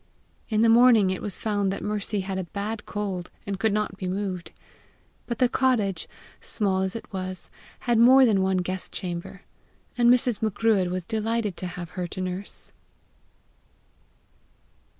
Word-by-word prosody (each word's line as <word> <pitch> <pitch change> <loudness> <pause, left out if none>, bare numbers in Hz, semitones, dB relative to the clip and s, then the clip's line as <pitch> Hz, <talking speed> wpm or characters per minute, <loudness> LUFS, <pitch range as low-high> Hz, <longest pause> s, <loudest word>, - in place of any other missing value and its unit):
In 215 -1 +2
the - - +5
morning 230 -4 +6
it 185 - -3
was 205 - 0
found 205 -3 0
that 195 - -5
Mercy 210 0 -2
had 190 0 -3
a 185 - -3
bad 210 +4 -5
cold, 195 -4 -4 0.2
and 195 -1 -4
could 220 +1 +2
not 210 -2 -1
be 185 - -4
moved. 185 -2 -3 0.8
But 235 - -3
the 250 - +4
cottage, 240 -7 0 0.3
small 195 -3 -1
as 190 +2 -2
it 225 - -8
was, 185 -1 -5 0.3
had 240 -2 +2
more 260 +3 +8
than 205 -5 +3
one 190 0 +1
guest 185 +1 -3
chamber, 180 +1 -6 0.5
and 240 -1 +4
Mrs. 245 -3 +2
Macruadh 215 -3 +2
was 180 -1 -3
delighted 220 -2 -1
to 185 - -4
have 175 -1 -7
her 180 -1 -4
to 180 - -8
nurse. 185 +2 -5
200 Hz, 160 wpm, -26 LUFS, 185-225 Hz, 0.8 s, more